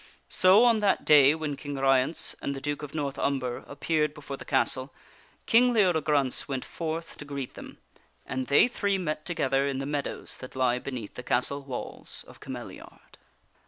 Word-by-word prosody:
So 190 +5 +6
on 230 -2 +4
that 205 -2 +1
day 145 -1 +7
when 155 -3 -3
King 145 0 -6
Ryence 135 +2 +1
and 140 - -2
the - - -5
Duke 145 +2 -3
of 150 0 -8
North 140 -3 -3
Umber 130 -3 -1
appeared 150 0 -1
before 140 -2 -7
the - - -10
castle, 130 0 +1 0.5
King 245 +2 +5
Leodegrance 155 - +2
went 135 -2 -3
forth 165 0 -5
to - - -8
greet 140 -3 -6
them - - -11 0.5
and 130 0 -3
they 140 - +6
three 200 -5 0
met 155 -4 -3
together 135 -5 +1
in 135 -1 -2
the 135 - -3
meadows 145 0 -4
that 130 - -10
lie 125 -1 +2
be 140 - -6
neath 120 -6 -6
the - - -7
castle 125 +3 0
walls 135 -3 -6
of - - -15
Cameliard. - - -10
140 Hz, 180 wpm, -28 LUFS, 135-160 Hz, 0.5 s, day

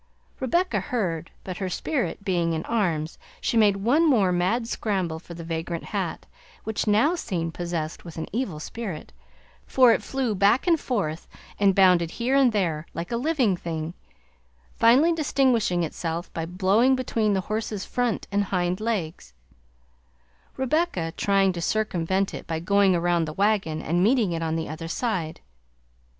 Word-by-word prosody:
Rebecca 270 - +1
heard, 180 -7 -2
but 185 -2 -6
her 190 -2 -3
spirit 245 - -2
being 170 -4 +1
in 160 0 -3
arms, 170 -9 -1 0.2
she - - -1
made 210 -3 +5
one 280 +11 +3
more 205 -9 +3
mad 190 +7 0
scramble 190 -8 -2
for 170 0 -11
the 170 - -8
vagrant 165 0 -4
hat, - - -4 0.4
which 220 0 -2
now 220 +10 +4
seemed 175 - -3
possessed 170 -3 -4
with 170 -2 -10
an 160 - -3
evil 205 -10 -2
spirit, 190 -2 -6 0.5
for 250 -3 +6
it - - 0
flew 265 -4 -2
back 200 +5 +3
and 335 -3 +3
forth, 180 - -2 0.3
and 200 -2 +4
bounded 180 -4 +5
here 245 +8 -1
and 270 -3 +5
there, 165 -7 -1
like 170 +4 -5
a - - 0
living 255 - +1
thing, 165 -1 -5 0.8
finally 270 +9 +5
distinguishing 255 - +1
itself 165 +1 -4
by 165 0 -3
blowing 200 +9 +3
between 225 -4 0
the 190 - +1
horse's 215 0 -3
front 245 -3 -1
and 200 0 +1
hind 180 -1 -1
legs, 170 - -3 1.2
Rebecca 265 - 0
trying 195 -1 +2
to 170 - -5
circumvent 190 -1 0
it - - -7
by 160 -1 -2
going 195 +2 +3
around 170 -1 +1
the 155 - -6
wagon, 195 -5 0
and 175 +3 +1
meeting 225 -3 +3
it 165 -1 -2
on 160 -1 -1
the 160 -1 -2
other 160 +2 -6
side. 175 -5 -2
195 Hz, 160 wpm, -25 LUFS, 170-230 Hz, 1.2 s, for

